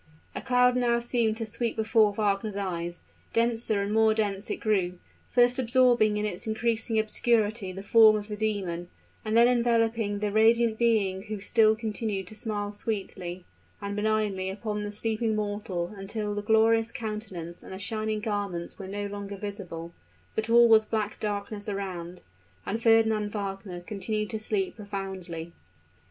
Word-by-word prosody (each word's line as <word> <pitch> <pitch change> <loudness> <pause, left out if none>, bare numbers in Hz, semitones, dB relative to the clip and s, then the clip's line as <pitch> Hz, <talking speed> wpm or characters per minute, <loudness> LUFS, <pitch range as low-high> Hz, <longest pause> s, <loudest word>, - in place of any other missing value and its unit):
A - - -4
cloud 250 -1 +3
now 240 -1 +2
seemed 235 -2 0
to 225 - -3
sweep 230 +2 -2
before 220 -1 +3
Wagner's 205 0 -1
eyes; 175 -3 -4 0.3
denser 230 -3 +1
and 205 +1 -2
more 220 0 +4
dense 205 -2 -1
it - - 0
grew 190 -5 0 0.3
first 245 +1 +3
absorbing 240 -3 +4
in 210 - -1
its 195 0 -4
increasing 225 0 0
obscurity 220 -2 +1
the 195 +1 -8
form 220 +1 +7
of 210 -1 -3
the 210 - -4
demon, 195 -5 -2 0.3
and 220 +1 +1
then 235 +1 +7
enveloping 230 -3 +2
the 205 0 -1
radiant 225 +1 +4
being 210 -5 +2
who 215 -1 -5
still 220 +2 +4
continued 215 -3 -3
to 180 - -10
smile 210 -2 -3
sweetly 190 -4 -4 0.3
and 200 0 -4
benignly 210 -3 0
upon 210 +1 -3
the 205 - -4
sleeping 220 +1 -1
mortal 205 -4 -3
until 205 +2 -4
the 205 - -2
glorious 225 +1 +3
countenance 205 -7 -6
and - - -12
the 190 - -5
shining 215 +2 -2
garments 205 -6 -3
were 190 - -6
no 205 +1 -4
longer 200 0 -6
visible, 185 -5 -6 0.4
but 220 +1 -2
all 235 +1 +7
was 220 -1 +6
black 215 -1 -2
darkness 205 0 -3
around. 180 -3 -5 0.4
And 225 +2 -2
Fernand 220 -2 +3
Wagner 195 -3 -5
continued 210 +3 -3
to 220 - -3
sleep 210 -2 -2
profoundly. 190 -5 -6
210 Hz, 160 wpm, -28 LUFS, 200-225 Hz, 0.4 s, form